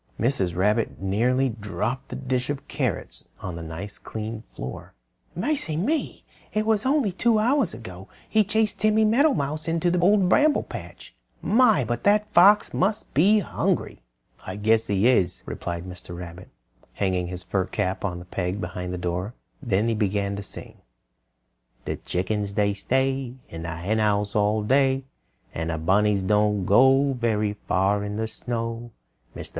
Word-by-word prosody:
Mrs. 100 -8 0
Rabbit 105 +5 +1
nearly 120 +8 +1
dropped 115 +4 -4
the - - -5
dish 130 -1 -2
of 145 0 -4
carrots 130 - -3
on 90 -2 -5
the 85 - -6
nice 85 +6 -7
clean 110 0 -6
floor. 65 - -7 0.4
"Mercy 180 - -1
me! 290 - -1 0.3
It 215 0 +1
was 220 +2 +1
only 275 -6 +2
about 185 - -11
two 230 -2 +4
hours 235 -2 +2
ago 95 -4 -10 0.2
he 220 -1 +3
chased 215 +1 0
Timmy 215 0 +4
Meadowmouse 215 - +2
into 170 +1 +1
the 180 - +1
Old 195 +1 +4
Bramble 295 +9 +4
Patch. - - -10 0.3
My! 220 - +4
but 120 +1 -3
that 205 +1 +5
old 210 - -26
fox 200 +4 +6
must 210 +4 -1
be 200 +9 +5
hungry!" - - -2 0.4
"I 95 - -6
guess 110 +2 +2
he 100 +3 +2
is," 95 -8 +2
replied 85 0 -5
Mr. 90 -1 -9
Rabbit, 90 0 -9 0.4
hanging 95 -3 -1
his 90 0 -6
fur 95 +1 -1
cap 95 0 -2
on 90 -3 -2
a 90 - -10
peg 90 +1 -3
behind 90 -1 -5
the 90 - -3
door. 90 +6 -3 0.3
Then 110 -4 +1
he 115 - +1
began 100 -2 0
to 100 - -5
sing: 100 - -10 1.1
"The - - -3
chickens 100 +2 -2
they 100 -1 +2
stay 130 +3 -1
In 80 - -7
the 85 0 -4
Henhouse 105 +3 0
all 105 +1 +2
day; 135 +3 +2 0.5
And 80 0 -3
the 80 - -1
bunnies 100 +4 +2
don't 105 0 +2
go 135 +6 +5
Very 110 -4 0
far 100 +2 +2
in 105 0 -4
the 110 0 -1
snow. 115 +1 -4 0.5
"Mr. - - -6
110 Hz, 165 wpm, -25 LUFS, 95-155 Hz, 1.1 s, fox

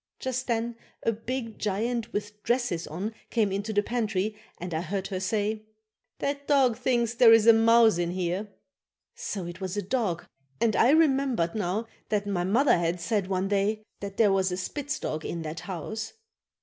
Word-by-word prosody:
Just 260 0 -3
then 235 0 -1 0.3
a 230 - +3
big 230 +1 -5
giant 225 +3 -1
with 210 0 -5
dresses 235 -9 0
on 190 +8 -4 0.2
came 215 -4 +1
into 200 +3 -2
the 205 -1 +2
pantry 215 -3 -1 0.2
and 180 0 -6
I 160 - 0
heard 190 +2 -3
her 190 -2 -2
say: 210 +2 -1 0.5
"That 280 0 -3
dog 265 -5 +4
thinks 235 -1 +1
there 235 -1 +7
is 225 -1 +7
a 230 - +9
mouse 225 -3 +5
in 170 -1 0
here." 180 +3 -2 0.7
So 195 -4 -4
it 175 +2 -8
was 190 +1 -3
a 205 - -1
dog 200 -5 -1 0.3
and 225 -2 +2
I 240 - +5
remembered 270 - +3
now 210 +1 -1 0.2
that 205 -1 0
my 195 -3 -1
mother 235 +4 +3
had 170 +1 0
said 195 +2 -1
one 190 0 0
day 205 +2 +1 0.2
that 200 -1 -7
there 210 -3 +5
was 190 -1 +2
a 180 - -2
spitz 275 +8 -3
dog 155 0 -4
in 170 -1 -4
that 155 +1 -5
house. 195 +4 -5
210 Hz, 185 wpm, -27 LUFS, 185-235 Hz, 0.7 s, a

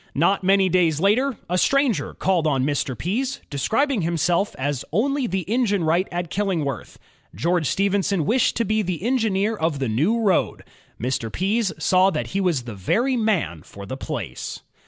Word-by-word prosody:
Not 185 +6 +2
many 195 0 +4
days 170 -4 +2
later, 225 +7 +2
a 180 +1 0
stranger 275 -2 +1
called 180 -4 +1
on 135 -3 +1
Mr. 140 -3 -1
Pease, 255 - -2
describing 225 - 0
himself 170 +4 0
as 140 -1 -2
"only 265 - +1
the 190 +1 -1
engine 210 -4 +1
wright 170 +4 +2
at 175 -1 -4
Killingworth." 170 - -2 0.4
George 170 - 0
Stephenson 195 -2 +1
wished 245 - +2
to 230 - 0
be 215 +2 +1
the 180 -3 -3
engineer 225 -4 +1
of 160 -6 -1
the 135 -2 -2
new 160 - +1
road. 200 -5 +1 0.4
Mr. 120 -2 -2
Pease 200 +3 0
saw 185 +1 +3
that 155 -5 -2
he 195 - -1
was 170 -9 0
the 120 -2 -7
very 235 - 0
man 185 - 0
for 100 +3 -11
the 115 - -5
place. 120 - -5
185 Hz, 170 wpm, -23 LUFS, 150-215 Hz, 0.4 s, many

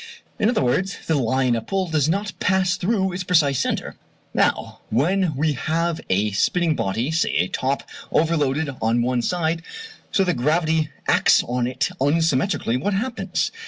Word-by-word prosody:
In 215 - +3
other 235 - +1
words, 185 +10 0
the 160 - 0
line 130 -2 +1
of 115 - -4
pull 195 -1 -1
does 155 -2 +1
not 200 +4 -1
pass 190 -2 +2
through 190 0 0
its 180 +1 -3
precise 155 -7 +2
centre. - - -2 0.4
Now - - 0
when 165 - +1
we 150 +2 +1
have 165 +4 -1
a 100 +3 +1
spinning 165 - +1
body, 115 +8 -1
say 160 +1 0
a 90 - +2
top, 135 +7 -2 0.3
overloaded 155 -2 +1
on 115 +1 +2
one 125 0 0
side 165 +3 -1 0.5
so 195 - +3
that 180 -2 0
gravity 155 +3 +1 0.2
acts - - +4
on 120 0 -1
it 125 - -1
unsymmetrically, 145 - +1
what 200 +5 0
happens? 235 +5 -2
160 Hz, 160 wpm, -22 LUFS, 130-180 Hz, 0.5 s, acts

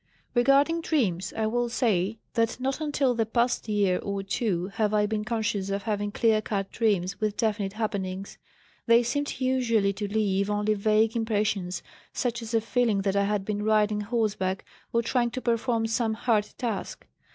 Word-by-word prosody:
"Regarding 275 +7 +4
dreams, 190 - 0
I 220 - +1
will 240 +2 0
say 220 -4 +1 0.2
that 230 0 0
not 270 +4 -2
until 285 -4 +1
the 225 -2 0
past 235 +1 0
year 200 -3 +2
or 200 -1 -3
two 195 -3 -1
have 215 0 0
I 210 0 +3
been 210 0 -2
conscious 215 -3 -1
of 200 0 -2
having 205 -2 -1
clear 220 0 +2
cut 195 -2 -3
dreams 200 -3 0
with 215 -1 -1
definite 210 -4 0
happenings. 200 -3 -4 0.5
They 235 +1 +6
seemed 285 +3 -2
usually 240 -6 +2
to 205 +1 -4
leave 200 -2 +1
only 210 +1 +1
vague 215 +2 +2
impressions, 205 -5 -1 0.3
such 240 -1 -1
as 230 0 -4
a 225 - +3
feeling 225 -3 +1
that 195 -1 0
I 200 0 +3
had 205 -1 -1
been 210 0 -2
riding 210 -1 +2
horseback, 205 -4 -1 0.3
or 235 0 +1
trying 240 +1 +1
to 255 - -4
perform 230 -1 0
some 225 -1 0
hard 220 -2 +1
task. 225 -6 -4
215 Hz, 175 wpm, -27 LUFS, 200-235 Hz, 0.5 s, They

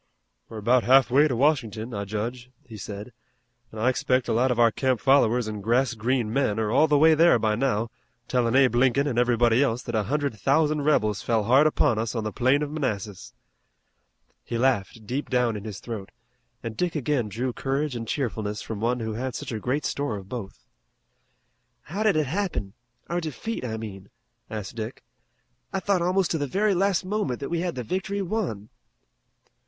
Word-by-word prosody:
"We're 110 - -8
about 120 +3 +3
half 130 0 +5
way 145 +4 +5
to 130 - -1
Washington, 120 -4 0
I 100 -1 -3
judge," 120 +5 -4 0.2
he 115 - -11
said, 105 +3 -7 0.6
"an' 110 - -10
I 110 +3 0
expect 130 0 +1
a - - 0
lot 125 +4 +2
of 125 - 0
our 115 -1 +5
camp 130 0 0
followers 125 -2 +3
and 105 -1 -5
grass 120 +5 +2
green 115 0 -1
men 115 -6 +1
are 110 -1 0
all 155 +6 +4
the 150 -1 +3
way 160 +2 +6
there 165 -2 +5
by 110 -1 +1
now, 115 -2 0 0.4
tellin' 120 -1 +1
Abe 135 -2 +5
Lincoln 135 +3 +3
an' 120 -4 0
everybody 120 0 +3
else 125 -3 0
that 120 - -6
a 110 - +2
hundred 140 -6 -1
thousand 150 +5 +2
rebels 105 -9 +2
fell 115 -2 +1
hard 130 +8 +5
upon 120 -7 +2
us 115 +2 -2
on 110 - -1
the 110 - -3
plain 130 +4 +2
of 145 - -4
Manassas." 105 - -4 1.1
He 115 - -4
laughed 115 -3 0
deep 130 +7 -3
down 125 -3 +1
in 105 0 -7
his 105 -3 -6
throat 110 -5 -6 0.5
and 115 -1 -5
Dick 180 +3 -1
again 135 -6 0
drew 120 +5 -3
courage 135 +2 -2
and 115 -1 -5
cheerfulness 110 -6 -2
from 110 -2 -5
one 120 +1 0
who 110 -1 -3
had 125 +2 -4
such - - -5
a 110 - -3
great 130 +7 -1
store 140 -7 -2
of 95 -1 -10
both. 110 -4 -8 1.2
"How 190 +10 -5
did 215 -4 +3
it 155 -1 +2
happen? 145 - -2 0.3
Our 175 +1 -1
defeat, 165 - -5
I 110 -3 -3
mean," 100 -3 -8 0.4
asked 105 -4 -5
Dick. 115 +2 -6 0.7
"I 195 - -1
thought 190 -1 +1
almost 180 +1 +1
to 160 - 0
the 145 - -1
very 200 +8 +1
last 190 0 +1
moment 185 - -2
that 140 - -5
we 170 - -1
had 175 0 -2
the 125 - -4
victory 195 - -2
won." 170 - -3
125 Hz, 200 wpm, -25 LUFS, 110-145 Hz, 1.2 s, way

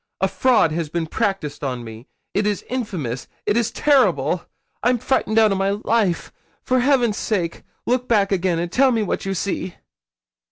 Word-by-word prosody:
A 190 - +2
fraud 235 -5 +3
has 160 -1 -2
been 170 +1 -2
practised 155 -3 -2
on 125 -3 -3
me 115 +2 -10 0.3
it 205 +1 +1
is 205 -1 -2
infamous 170 - -4 0.2
it 205 - +1
is 235 -1 +2
terrible. 280 +2 +2 0.4
I'm 245 0 +3
frightened 225 -2 0
out 220 -2 +5
of 195 - 0
my 195 0 +1
life. 205 -3 0 0.3
For 255 -1 +2
heaven's 245 -5 +2
sake, 175 -6 -2 0.2
look 250 +1 0
back 205 -4 +2
again, 185 -2 +1
and 170 +1 -2
tell 265 +4 +4
me 225 -3 +1
what 195 - -3
you 195 - -1
see.' 185 0 -3
200 Hz, 175 wpm, -21 LUFS, 170-235 Hz, 0.4 s, out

